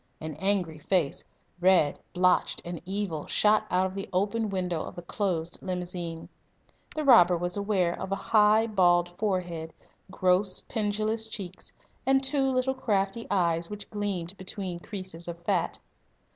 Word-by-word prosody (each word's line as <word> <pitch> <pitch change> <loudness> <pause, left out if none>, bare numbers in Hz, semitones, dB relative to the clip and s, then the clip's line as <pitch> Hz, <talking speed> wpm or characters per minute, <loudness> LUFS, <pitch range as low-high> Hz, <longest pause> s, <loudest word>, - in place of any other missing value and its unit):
An 155 0 -5
angry 185 -5 0
face, 165 -2 0 0.4
red, 180 -5 +4
blotched, 180 0 +2
and 175 -1 -5
evil, 190 -5 -3
shot 215 0 +3
out 185 +1 +2
of 190 - -3
the 195 0 -5
open 210 +4 0
window 180 -4 -1
of - - -7
the 175 - -8
closed 175 -3 -2
limousine. 180 -3 -4 0.7
The 310 - -1
robber 185 -11 +7
was 175 +1 -2
aware 200 -4 +1
of 190 - -5
a - - +2
high, 215 +1 +4
bald 175 -5 +3
forehead, 175 -4 -2 0.4
gross 185 +1 +2
pendulous 215 +1 -1
cheeks, 190 -4 -6 0.3
and 270 0 +3
two 270 0 +1
little 255 +1 +1
crafty 210 -3 -1
eyes 170 -4 +1
which 210 -1 -8
gleamed 200 -4 -3
between 185 -2 -5
creases 185 -3 -7
of 170 0 -5
fat. - - 0
190 Hz, 145 wpm, -28 LUFS, 175-210 Hz, 0.7 s, robber